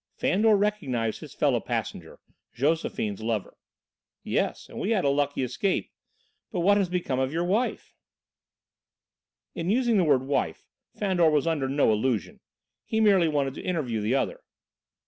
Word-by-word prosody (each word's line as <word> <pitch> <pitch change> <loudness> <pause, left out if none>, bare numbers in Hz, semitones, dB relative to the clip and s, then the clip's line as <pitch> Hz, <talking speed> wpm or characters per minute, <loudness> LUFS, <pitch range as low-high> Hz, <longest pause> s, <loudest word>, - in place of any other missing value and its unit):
Fandor 210 +2 +3
recognised 145 - -1
his - - -11
fellow - - +2
passenger, - - -5 0.4
Josephine's 125 -7 -1
lover. 110 -3 -3 0.7
"Yes, - - -1
and - - -9
we 200 - -2
had 210 -8 +1
a - - +4
lucky 145 -1 0
escape. 130 - -1 0.6
But 180 - -2
what 200 +3 +4
has 195 -3 +1
become 175 -8 -1
of 130 0 0
your 165 +2 -1
wife?" 210 +8 -1 1.6
In 170 +1 -3
using 235 0 +2
the 185 - +4
word 140 -5 +3
"wife" 130 - -2 0.3
Fandor 185 -5 +2
was 150 -2 +2
under 150 -5 0
no 140 -4 +3
illusion; 110 0 -1 0.4
he 220 - -1
merely 195 -6 +5
wanted 140 -3 0
to - - -8
interview 135 -11 -2
the 110 +5 +1
other. - - -1
155 Hz, 150 wpm, -26 LUFS, 130-195 Hz, 1.6 s, merely